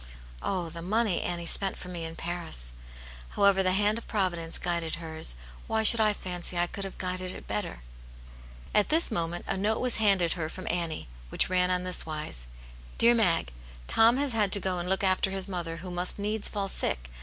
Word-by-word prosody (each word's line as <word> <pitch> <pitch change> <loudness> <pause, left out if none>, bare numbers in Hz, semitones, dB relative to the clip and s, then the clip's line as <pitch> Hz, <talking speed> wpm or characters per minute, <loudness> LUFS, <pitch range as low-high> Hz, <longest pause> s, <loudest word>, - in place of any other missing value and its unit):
Oh, 180 -4 -2
the 170 +1 -8
money 210 +1 +1
Annie 170 -1 -3
spent 195 +3 +2
for - - -9
me 175 -2 -5
in 165 0 -7
Paris! 165 - -4 0.6
However, 200 -1 +5
the 185 -1 +2
hand 210 +3 +2
of - - -15
Provi 185 -5 0
dence 165 0 -1
guided 170 -2 -2
hers; 160 - 0 0.3
why 220 0 0
should 225 +1 +9
I 215 -1 +4
fancy 180 -3 -4
I 175 - +3
could 195 +3 -6
have 195 - -8
guided 185 0 -4
it - - -10
better? 100 -12 -4 0.4
" - - -18
At 210 - +3
this 320 -2 +3
moment 170 -3 -2
a - - -1
note 210 +3 0
was 250 -2 +3
handed 195 -6 +3
her 160 -3 -4
from 185 +3 -8
Annie, 170 - -3 0.2
which - - 0
ran 180 0 +2
on 180 0 0
this 180 -1 +2
wise: 150 - -5 0.5
"Dear 235 +1 +6
Mag, 175 - +1 0.2
— - - -18
^Tom 230 +2 +5
has 280 -1 +1
had 210 -3 +1
to 200 - +9
go 185 -1 -2
and 175 +1 -2
look 190 +1 +1
after 190 0 +2
his 190 0 -3
mother, 170 -3 -4
who 180 - -6
must 175 +1 -2
needs 210 +1 -2
fall 200 -2 -3
sick. - - -2
180 Hz, 210 wpm, -28 LUFS, 165-200 Hz, 0.6 s, should